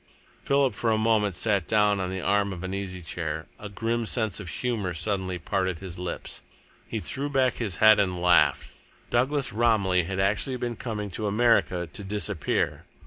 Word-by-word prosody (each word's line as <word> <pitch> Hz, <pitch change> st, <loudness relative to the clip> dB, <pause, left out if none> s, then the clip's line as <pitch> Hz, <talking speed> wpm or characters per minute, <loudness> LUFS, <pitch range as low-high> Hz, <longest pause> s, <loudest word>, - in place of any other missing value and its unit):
Philip 140 Hz, -1 st, +2 dB
for 115 Hz, -, -1 dB
a 110 Hz, -, +2 dB
moment 110 Hz, -3 st, +2 dB
sat 100 Hz, -2 st, 0 dB
down 105 Hz, -2 st, +3 dB
on 95 Hz, -1 st, -2 dB
the 95 Hz, 0 st, -4 dB
arm 100 Hz, 0 st, +1 dB
of 90 Hz, 0 st, -8 dB
an 95 Hz, 0 st, -4 dB
easy 95 Hz, -2 st, -5 dB
chair. 80 Hz, -2 st, -4 dB
A 105 Hz, -, -7 dB
grim 115 Hz, +3 st, -2 dB
sense 110 Hz, -6 st, -1 dB
of 95 Hz, -4 st, -7 dB
humour 105 Hz, -8 st, -2 dB
suddenly 95 Hz, 0 st, -2 dB
parted 95 Hz, 0 st, -1 dB
his 90 Hz, -1 st, -8 dB
lips. 90 Hz, -1 st, -6 dB, 0.5 s
He -, -, -3 dB
threw 140 Hz, +2 st, -3 dB
back 130 Hz, -3 st, +1 dB
his 105 Hz, -7 st, -2 dB
head 110 Hz, +1 st, +6 dB
and 90 Hz, -3 st, 0 dB
laughed. 85 Hz, -5 st, +3 dB, 0.4 s
Douglas 135 Hz, +3 st, +1 dB
Romilly 105 Hz, -6 st, +2 dB
had 95 Hz, +2 st, -3 dB
actually 105 Hz, +7 st, +1 dB
been 120 Hz, -1 st, -3 dB
coming 105 Hz, -4 st, -4 dB
to 105 Hz, +4 st, -3 dB
America 105 Hz, -5 st, +2 dB
to 110 Hz, -4 st, -7 dB
disappear! 105 Hz, -3 st, -1 dB
100 Hz, 180 wpm, -26 LUFS, 90-115 Hz, 0.5 s, head